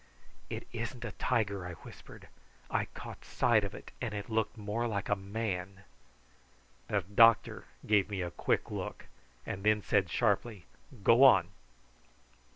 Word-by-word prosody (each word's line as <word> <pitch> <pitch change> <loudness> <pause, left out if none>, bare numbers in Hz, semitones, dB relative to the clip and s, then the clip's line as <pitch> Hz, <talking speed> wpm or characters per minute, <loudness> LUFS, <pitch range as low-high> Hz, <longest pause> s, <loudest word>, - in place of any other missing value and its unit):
"It - - -6
isn't 120 +1 -5
a 115 - -4
tiger," 100 -2 -1
I 90 - -6
whispered. - - -13 0.4
"I - - +1
caught - - -10
sight 115 -3 +2
of 100 0 -5
it, - - -11
and 115 -4 -3
it 105 +2 -6
looked 110 +1 0
more 105 +3 -2
like 100 -4 -3
a 100 - +3
man." 95 -2 -4 1.0
The 105 - +1
doctor 110 +4 +4 0.2
gave 105 -2 +3
me 100 -3 -2
a 85 - -4
quick - - -1
look, - - -5 0.4
and 95 - -5
then 105 -1 +3
said 95 -3 +2
sharply, 105 -2 0 0.4
"Go 115 +6 +6
on!" 95 -10 +7
105 Hz, 150 wpm, -31 LUFS, 95-115 Hz, 1.0 s, on